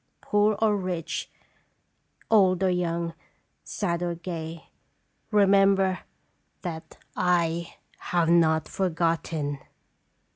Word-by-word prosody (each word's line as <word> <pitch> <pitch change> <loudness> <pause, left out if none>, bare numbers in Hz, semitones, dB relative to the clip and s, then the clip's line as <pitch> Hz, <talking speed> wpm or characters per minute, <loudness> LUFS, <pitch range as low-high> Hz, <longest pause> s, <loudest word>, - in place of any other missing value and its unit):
Poor 210 0 +2
or 220 -2 +3
rich, 180 -4 -3 1.0
old 190 -4 +4
or 185 - +3
young, 170 -1 -1 0.5
sad 175 -4 -2
or 175 -1 -1
gay, 165 -2 -6 0.6
remember 195 -2 +4 0.6
that 165 -3 -7 0.2
I 170 -2 0 0.2
have 175 -2 0
not 160 -2 +3
forgot 165 -3 0
ten.'" 145 -3 -3
175 Hz, 95 wpm, -26 LUFS, 165-195 Hz, 1.0 s, old